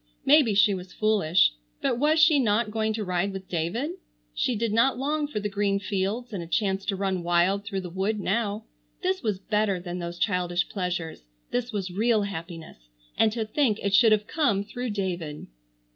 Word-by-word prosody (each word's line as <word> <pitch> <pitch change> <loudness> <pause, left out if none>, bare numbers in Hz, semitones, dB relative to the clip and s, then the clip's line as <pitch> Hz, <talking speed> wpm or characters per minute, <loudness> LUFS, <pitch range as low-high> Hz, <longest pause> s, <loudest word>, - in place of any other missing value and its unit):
Maybe 275 -7 +5
she 205 +1 +5
was 180 -1 -7
foolish, 195 - +3 0.3
but 240 - 0
was 305 +3 +3
she 310 -2 +6
not 215 -2 +1
going 220 0 0
to 215 0 -3
ride 180 +2 0
with 190 -1 -7
David? 180 - -2 0.4
She 230 - 0
did 220 0 -1
not 245 +4 +3
long 295 +3 -1
for 250 -8 -3
the 210 - -2
green 200 -1 0
fields 205 +4 -2
and 190 - -3
a 170 - -7
chance 195 +1 0
to 200 - 0
run 190 -2 -1
wild 175 +3 +2
through 195 -2 -3
the 180 - -7
wood 195 +4 -1
now. 210 +1 -1 0.4
This 375 +1 0
was 215 -5 -1
better 210 -1 0
than 175 0 -6
those 170 0 -5
childish 180 -2 0
pleasures. 180 - -3 0.3
This 245 0 -1
was 195 -4 -3
real 215 +3 +2
happiness. 165 - -8 0.3
And 220 - +3
to 225 -2 -2
think 225 -2 +1
it 200 -1 0
should 225 +2 +6
have 210 -1 +3
come 225 -9 +1
through 245 +4 -5
David! 180 -7 -4
205 Hz, 190 wpm, -26 LUFS, 180-225 Hz, 0.4 s, she